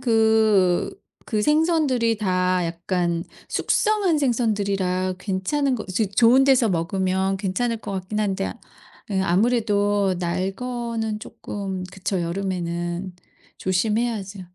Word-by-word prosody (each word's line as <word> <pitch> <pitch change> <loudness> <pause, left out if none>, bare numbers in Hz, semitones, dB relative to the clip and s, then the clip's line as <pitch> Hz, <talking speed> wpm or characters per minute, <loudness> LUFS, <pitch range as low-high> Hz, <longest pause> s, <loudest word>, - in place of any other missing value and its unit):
그 220 - +3 0.3
그 215 -3 -1
생선들이 300 -5 +2
다 185 -3 +1
약간 170 0 -1 0.3
숙성한 410 -7 +1
생선들이라 200 -8 0
괜찮은 250 +9 0
거 215 - -5
이제 195 +4 +1
좋은 230 +6 +5
데서 260 -4 +4
먹으면 190 +2 0
괜찮을 210 +5 -1
것 205 -2 -7
같긴 190 +3 -3
한데 195 -2 -1 0.6
이 195 -2 0
아무래도 205 -1 +2
날 185 +2 -1
거는 235 -3 -3
쪼끔 190 -4 -6
그쵸 190 -1 -2
여름에는 175 0 -3 0.4
조심해야죠. 205 +1 -1
200 Hz, 245 characters per minute, -23 LUFS, 185-230 Hz, 0.6 s, 좋은